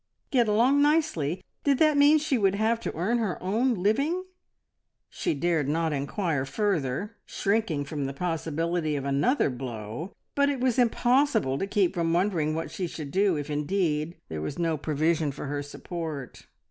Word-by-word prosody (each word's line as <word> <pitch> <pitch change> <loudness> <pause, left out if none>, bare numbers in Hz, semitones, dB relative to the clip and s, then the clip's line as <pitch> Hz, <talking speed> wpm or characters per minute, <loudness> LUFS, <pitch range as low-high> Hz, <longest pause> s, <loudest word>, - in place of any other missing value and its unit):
"Get 245 -5 +3
along 245 +7 +4
nicely!" 290 - +1 0.2
Did 280 -2 +3
that 310 0 +4
mean 290 +2 +6
that 305 - -2
she 290 - +1
would 200 -4 +2
have 220 +2 +1
to - - -5
earn 220 +8 +1
her 210 -6 -1
own 230 +7 +1
living? 275 - +1 0.9
She - - -1
dared 155 -1 0
not 160 0 0
inquire 145 +1 -1
further, 185 - -1
shrinking 200 -8 0
from 140 -1 -3
the - - -3
possibility 165 0 -1
of 140 -1 -3
another 140 - +2
blow, 120 - -6 0.2
but 280 0 +3
it 280 -2 -1
was 255 -1 +1
impossible 245 - +2
to 195 - -1
keep 195 -3 +2
from 165 -1 0
wondering 170 -4 +1
what 165 +1 -4
she 185 - -3
should 150 -4 -7
do 195 -1 +3
if 145 0 -4
indeed 155 +1 0
there 80 -1 -5
was 75 - -4
no 165 -2 +1
provision 155 +1 0
for 135 - -7
her 145 +1 -2
support. 150 -1 -7
175 Hz, 170 wpm, -27 LUFS, 150-225 Hz, 0.9 s, mean